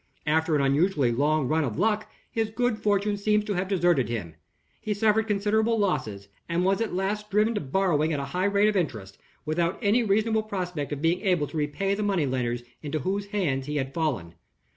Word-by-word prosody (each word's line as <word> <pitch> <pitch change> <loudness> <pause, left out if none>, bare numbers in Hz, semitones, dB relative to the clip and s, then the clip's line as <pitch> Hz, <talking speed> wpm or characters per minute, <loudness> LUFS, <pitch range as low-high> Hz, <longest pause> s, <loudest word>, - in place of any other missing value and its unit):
After 160 +1 +2
an 140 - +2
unusually 140 -1 +2
long 145 +3 +1
run 160 +2 +1
of 115 -7 -3
luck, 215 0 +1 0.2
his 225 -1 -1
good 245 0 0
fortune 205 0 +1
seems 210 +1 +1
to 210 - -1
have 185 0 -1
deserted 175 - +2
him. 100 -9 -4 0.5
He 210 -1 -2
suffered 220 +1 +2
considerable 215 +2 +1
losses, 110 - -1 0.2
and 170 +2 +1
was 195 +3 +2
at 225 -5 -2
last 205 +3 -2
driven 210 +3 +2
to 210 - -2
borrowing 155 +1 +1
at 150 - -1
a 140 - -3
high 180 +1 +1
rate 200 +1 +3
of 215 - +1
interest, 110 - -3 0.3
without 170 +3 0
any 220 +2 +3
reasonable 220 +1 +2
prospect 180 -9 -4
of 145 +1 -4
being 170 +3 +2
able 180 -7 +2
to 155 - -11
repay 150 +7 -1
the 205 - -2
money 195 -7 +1
lenders 120 -2 -2 0.2
into 155 0 -3
whose 195 +7 -2
hands 155 -11 -1
he 150 - -3
had 135 -2 -2
fallen. 120 - -2
180 Hz, 205 wpm, -26 LUFS, 145-210 Hz, 0.5 s, rate